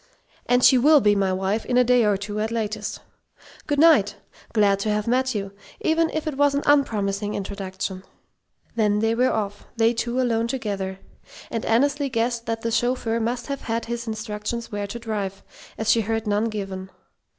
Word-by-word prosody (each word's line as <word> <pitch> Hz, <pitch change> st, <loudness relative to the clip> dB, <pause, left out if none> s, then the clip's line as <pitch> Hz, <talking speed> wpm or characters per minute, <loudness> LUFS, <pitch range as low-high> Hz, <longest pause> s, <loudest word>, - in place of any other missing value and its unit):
"And 245 Hz, 0 st, +3 dB
she 260 Hz, -, +7 dB
will 300 Hz, +4 st, +6 dB
be 210 Hz, -5 st, +4 dB
my 195 Hz, -1 st, +1 dB
wife 195 Hz, +4 st, -1 dB
in 245 Hz, -, 0 dB
a 250 Hz, -, +6 dB
day 250 Hz, 0 st, +4 dB
or 205 Hz, -2 st, +2 dB
two 205 Hz, +1 st, -5 dB
at 215 Hz, +1 st, -1 dB
latest. 215 Hz, -2 st, -3 dB, 0.7 s
Good 290 Hz, -, 0 dB
night! 295 Hz, -10 st, +5 dB, 0.4 s
Glad 200 Hz, -3 st, +3 dB
to 215 Hz, -, -1 dB
have 210 Hz, 0 st, 0 dB
met 260 Hz, +1 st, +1 dB
you, 200 Hz, -1 st, -3 dB, 0.3 s
even 320 Hz, 0 st, +2 dB
if 315 Hz, 0 st, -3 dB
it 305 Hz, -4 st, -3 dB
was 285 Hz, 0 st, +3 dB
an 285 Hz, -, 0 dB
unpromising 210 Hz, -8 st, +1 dB
introduction." 195 Hz, -1 st, -5 dB, 0.7 s
Then 210 Hz, -2 st, +2 dB
they 225 Hz, +1 st, +1 dB
were 250 Hz, +3 st, +2 dB
off, 205 Hz, -2 st, -3 dB
they 225 Hz, +1 st, +4 dB
two 240 Hz, +2 st, -2 dB
alone 230 Hz, -2 st, +1 dB
together; 200 Hz, -7 st, -3 dB, 0.5 s
and 230 Hz, -, -2 dB
Annesley 280 Hz, +4 st, +2 dB
guessed 235 Hz, -1 st, -1 dB
that 225 Hz, 0 st, -2 dB
the 230 Hz, -, -2 dB
chauffeur 235 Hz, -1 st, 0 dB
must 235 Hz, +2 st, -2 dB
have 280 Hz, -1 st, -4 dB
had 230 Hz, -1 st, -2 dB
his 235 Hz, 0 st, -4 dB
instructions 220 Hz, +1 st, -4 dB
where 205 Hz, -1 st, -3 dB
to 205 Hz, -, -6 dB
drive, 205 Hz, -4 st, -4 dB, 0.3 s
as 220 Hz, 0 st, +2 dB
she 230 Hz, -, +4 dB
heard 225 Hz, +1 st, -2 dB
none 210 Hz, +1 st, +1 dB
given. 195 Hz, -4 st, -5 dB
225 Hz, 185 wpm, -24 LUFS, 205-245 Hz, 0.7 s, she